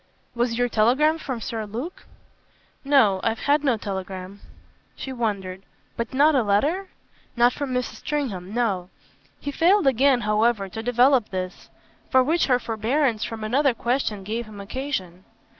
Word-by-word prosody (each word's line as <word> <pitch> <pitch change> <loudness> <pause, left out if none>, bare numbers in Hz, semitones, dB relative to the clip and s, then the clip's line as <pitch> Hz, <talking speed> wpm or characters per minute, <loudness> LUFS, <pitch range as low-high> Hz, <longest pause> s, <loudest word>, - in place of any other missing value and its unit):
"Was 235 -1 0
your 245 0 +2
telegram 260 +9 +3
from 260 -6 -5
Sir 220 0 -4
Luke?" 245 - -7 0.8
"No 265 -9 +4
I've 225 0 -1
had 290 +1 +2
no 255 -5 +2
telegram." 190 -1 -6 0.6
She 265 - -6
wondered. 200 -6 -3 0.3
"But 235 - -3
not 290 +4 +4
a 265 - +4
letter 290 - +1 0.2
?" - - -34
"Not 240 +1 +4
from 285 -3 -4
Mrs. 250 0 -2
Stringham 220 -12 -3
no." 205 -6 -1 0.5
He 285 - -4
failed 350 +5 +3
again 265 0 +4
however 210 -1 +1
to 220 +3 -6
develop 245 0 +3
this 185 -1 -5 0.4
for 260 0 +5
which 320 +5 +1
her 250 -2 +4
forbearance 230 +1 0
from 225 -1 -5
another 260 +4 +2
question 235 -5 -1
gave 225 +3 -4
him 210 -2 -11
occasion. 195 -5 -4
235 Hz, 155 wpm, -24 LUFS, 210-275 Hz, 0.8 s, for